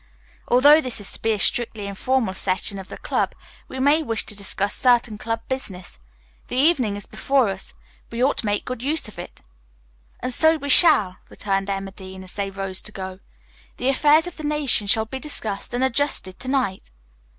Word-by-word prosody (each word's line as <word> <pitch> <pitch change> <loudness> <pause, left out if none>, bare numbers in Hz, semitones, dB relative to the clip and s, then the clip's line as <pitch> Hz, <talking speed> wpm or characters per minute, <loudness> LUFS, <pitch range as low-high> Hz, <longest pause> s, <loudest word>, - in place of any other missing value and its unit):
Although 290 +6 +6
this 250 -5 -4
is 205 - -4
to - - -10
be 225 - +1
a 215 - 0
strictly 225 -1 0
informal 220 +2 -1
session 190 +1 0
of 190 - -9
the - - -9
club, - - -2 0.3
we 260 - -8
may 290 +4 +3
wish 225 -7 -1
to 215 - -2
discuss 200 0 -1
certain 240 -4 +2
club 225 0 -3
business. 190 - -4 0.5
The - - -5
evening 260 -7 +2
is 205 - -4
before 270 -5 +1
us. 190 -1 -6 0.4
We 235 +2 -1
ought 275 - +2
to 220 - -3
make 205 0 -1
good 255 -2 -5
use 295 +2 0
of 215 - -12
it." 175 - -10 0.8
"And 250 +1 -1
so 320 +3 +5
we 285 -1 -6
shall," 215 - +5
returned 195 -1 -2
Emma 195 0 -3
Dean, 190 -1 -10
as 185 - -6
they 200 -1 -3
rose 195 -1 -4
to 210 - -7
go. 190 -2 -7 0.6
"The 255 - 0
affairs 295 +4 +4
of 355 - -7
the 310 - -8
nation 295 -8 +1
shall 220 +2 +4
be 265 +4 -6
discussed 220 -9 -2
and 245 +1 -1
adjusted 265 -7 +1
to 255 - -9
night." 255 - -1
225 Hz, 195 wpm, -22 LUFS, 195-265 Hz, 0.8 s, Although